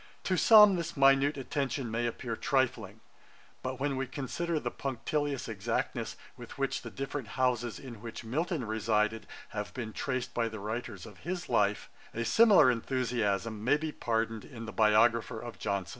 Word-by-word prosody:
To 185 - +1
some, 210 -1 +8
this 170 -1 -4
minute 135 +1 +4
attention 135 -2 -2
may 120 +1 0
appear 115 0 -4
trifling; 115 -6 -1 0.6
but 130 0 -4
when 140 0 0
we 135 0 -2
consider 155 +5 -2
the - - -3
punctilious 140 +1 -2
exactness 105 -4 -2 0.2
with - - -11
which - - -1
the - - -7
different 135 -2 -5
houses 125 -2 +1
in 120 -6 -10
which 115 0 -7
Milton 150 +4 -2
resided 110 0 0 0.2
have 105 -1 -5
been 115 -4 -5
traced 130 -2 -3
by 115 -1 0
the 110 -1 -7
writers 110 +4 -5
of - - -13
his 180 +1 -5
life, 105 -4 +1 0.3
a 115 +1 -1
similar 205 - +6
enthusiasm 115 -4 -1
may 145 - +4
be 155 0 -4
pardoned 115 -4 -2
in 115 -5 -9
the 110 - -7
biographer 110 +2 +3
of 120 0 -8
Johnson. 100 -3 -2
120 Hz, 165 wpm, -30 LUFS, 110-140 Hz, 0.6 s, some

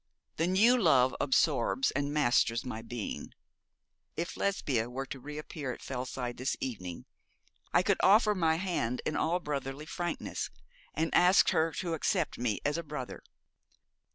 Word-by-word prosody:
'The 165 - +1
new 210 +7 +5
love 130 -8 +4
absorbs 150 - +2
and 145 0 -1
masters 125 -4 +2
my 115 -3 -5
being. 115 -1 -6 0.8
If 170 +1 -3
Lesbia 135 - 0
were 135 +2 -4
to 135 - -7
re 150 +3 -8
appear 150 -3 -5
at - - -12
Fellside 125 -1 -4
this 130 +2 -1
evening, 90 -9 -5 0.7
I - - +4
could - - +2
offer 210 +2 +6
her - - 0
my 165 -4 +2
hand 165 -9 -2
in 155 - -1
all 170 +3 +1
brotherly 140 -2 -4
frankness, 175 +2 -3 0.5
and 160 +1 -1
ask 180 +2 +6
her 160 +1 +2
to 175 -3 -3
accept 165 -1 0
me 120 -4 0
as 145 +3 +1
a - - -4
brother. 150 -5 -6
150 Hz, 155 wpm, -31 LUFS, 125-170 Hz, 0.8 s, offer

